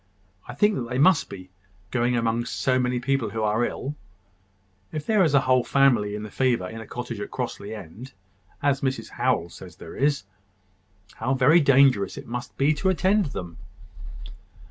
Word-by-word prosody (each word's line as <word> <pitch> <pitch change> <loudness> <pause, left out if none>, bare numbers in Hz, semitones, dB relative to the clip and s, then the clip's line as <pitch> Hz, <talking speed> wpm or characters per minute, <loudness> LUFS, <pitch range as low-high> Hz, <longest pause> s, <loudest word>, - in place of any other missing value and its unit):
"I 125 - -8
think 195 - +1
they 125 - -2
must 150 +2 +4
be, 95 -2 -10 0.4
going 120 0 +1
among 115 0 0
so 130 +1 0
many 125 0 0
people 130 -2 -1
who 110 +1 -3
are 110 +3 +1
ill. 135 +3 -3 1.0
If 155 -2 -5
there 215 -3 +3
is 155 -4 +2
a 140 - +5
whole 130 -2 +3
family 120 -8 +2
in 105 - -6
the 105 - -8
fever 120 -8 +1
in 115 +3 -8
a 110 - -10
cottage 120 -3 -6
at 105 - -5
Crossly 110 -4 -5
End, 105 +7 -10 0.5
as 140 -1 +2
Mrs 130 -1 -2
Howell 85 - 0
says 90 -4 -12
there 80 - -11
is, 140 -2 +1 0.9
how 130 - 0
very 135 +6 +5
dangerous 135 -7 +4
it - - -8
must 120 +1 -6
be 140 +3 +3
to 190 +6 0
attend 190 +1 +2
them!" 90 - -7
125 Hz, 175 wpm, -25 LUFS, 110-140 Hz, 1.0 s, a